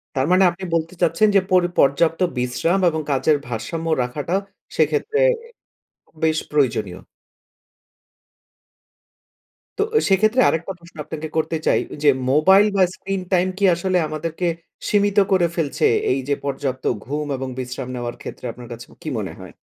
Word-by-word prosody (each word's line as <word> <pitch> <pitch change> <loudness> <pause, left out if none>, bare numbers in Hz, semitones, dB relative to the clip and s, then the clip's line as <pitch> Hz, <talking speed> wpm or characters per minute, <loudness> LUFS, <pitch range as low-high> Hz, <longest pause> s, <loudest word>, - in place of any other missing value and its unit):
তার 130 -1 +1
মানে 185 +1 +5
আপনি 175 +2 -11
বলতে 165 +1 -1
চাচ্ছেন 165 +7 +3
যে - - +8
পর 185 -1 +5 0.2
পর্যাপ্ত 160 +4 +3 0.2
বিশ্রাম 125 +9 0
এবং 160 -1 -2
কাজের 145 +2 +3
ভারসাম্য 160 +8 -4 0.2
রাখাটা 145 +7 -4 0.4
সেক্ষেত্রে 160 - +1 0.3
এ - - -14 0.8
বেশ 160 -1 +2
প্রয়োজনীয়। 110 -11 0 2.8
তো 415 - +4
এ - - +6
সেক্ষেত্রে 215 +6 +3
আরেকটা 165 +4 -2
প্রশ্ন 170 0 -18
আপনাকে 155 0 -6
করতে 160 +1 0
চাই, - - +4
ওইযে 150 0 +2 0.2
মোবাইল 190 +8 +6
বা, 190 - +5
স্ক্রিন 195 -1 -4
টাইম 180 +1 +3
কি 200 - -3
আসলে 185 +2 0
আমাদেরকে 160 +3 -4 0.4
সীমিত 205 -1 +2
করে 180 -3 +4
ফেলছে 155 -5 0 0.3
এইযে 135 +2 0
পর্যাপ্ত 135 -2 -3 0.2
ঘুম 150 +4 -3
এবং 130 0 -4
বিশ্রাম 125 0 -5
নেওয়ার 120 -1 -4
ক্ষেত্রে, - - -8
আপনার 120 0 -11
কাছে 120 +1 -10 0.2
কী - - -4
মনে - - -5
হয়? - - -10
160 Hz, 145 wpm, -21 LUFS, 135-185 Hz, 2.8 s, যে